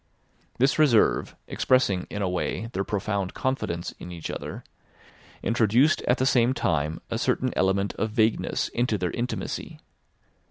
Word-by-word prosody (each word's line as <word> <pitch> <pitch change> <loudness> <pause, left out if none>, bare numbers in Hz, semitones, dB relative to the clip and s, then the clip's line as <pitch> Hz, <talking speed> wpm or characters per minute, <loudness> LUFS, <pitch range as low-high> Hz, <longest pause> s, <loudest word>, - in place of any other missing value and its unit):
This 135 +5 +2
reserve, 130 -8 +3
expressing, 110 -8 +1
in 105 - -3
a - - +1
way, 90 +5 -2
their 95 - -1
profound 100 -2 -2
confidence 130 -11 -2
in 90 - -8
each 85 -2 -5
other, - - -6 0.8
introduced 120 +6 +3
at 125 - +3
the 130 - +1
same 125 -1 +3
time 80 0 0
a - - -1
certain - - 0
element 95 +1 +1
of 110 - 0
vagueness 110 0 +1
into 120 -3 0
their 90 -2 -2
intimacy. 125 +1 -4
110 Hz, 145 wpm, -26 LUFS, 95-125 Hz, 0.8 s, reserve